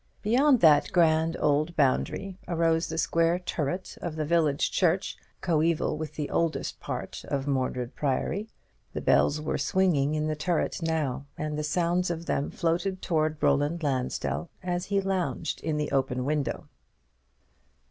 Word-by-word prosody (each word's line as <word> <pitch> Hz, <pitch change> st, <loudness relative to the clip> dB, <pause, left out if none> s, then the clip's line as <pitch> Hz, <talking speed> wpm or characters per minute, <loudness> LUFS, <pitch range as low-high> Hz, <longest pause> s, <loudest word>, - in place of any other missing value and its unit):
Beyond 255 Hz, +4 st, +4 dB
that 155 Hz, -3 st, +5 dB
grand 165 Hz, -2 st, +3 dB
old 150 Hz, +3 st, +1 dB
boundary 180 Hz, +7 st, 0 dB
arose 165 Hz, -1 st, +1 dB
the 160 Hz, -, -4 dB
square 165 Hz, +1 st, +2 dB
turret 180 Hz, 0 st, -4 dB
of 170 Hz, -3 st, -4 dB
the 155 Hz, -1 st, -2 dB
village 155 Hz, -3 st, +2 dB
church, 180 Hz, 0 st, +1 dB, 0.3 s
coeval 165 Hz, -2 st, +1 dB
with 155 Hz, 0 st, -6 dB
the 150 Hz, -2 st, -4 dB
oldest 165 Hz, -1 st, -1 dB
part -, -, -5 dB
of 140 Hz, -1 st, -2 dB
Mordred 130 Hz, -3 st, -1 dB
Priory. 160 Hz, +9 st, -1 dB, 0.4 s
The -, -, -3 dB
bells 150 Hz, -, +3 dB
were 155 Hz, -, -2 dB
swinging 155 Hz, -6 st, +2 dB
in 155 Hz, 0 st, 0 dB
the 155 Hz, 0 st, -1 dB
turret 160 Hz, +3 st, -1 dB
now, 145 Hz, -5 st, -1 dB
and 150 Hz, 0 st, -3 dB
the 150 Hz, -, -2 dB
sound 175 Hz, +3 st, +1 dB
of 170 Hz, -1 st, -4 dB
them 140 Hz, -, -1 dB
floated 175 Hz, +2 st, -1 dB
towards 155 Hz, -3 st, 0 dB
Roland 145 Hz, +4 st, +2 dB
Lansdell 135 Hz, +4 st, -1 dB
as 180 Hz, 0 st, -2 dB
he 200 Hz, 0 st, +1 dB
lounged 190 Hz, -4 st, -2 dB
in 155 Hz, -2 st, -1 dB
the 150 Hz, 0 st, -2 dB
open 130 Hz, -2 st, 0 dB
window. 150 Hz, -1 st, -1 dB
160 Hz, 150 wpm, -27 LUFS, 150-175 Hz, 0.4 s, that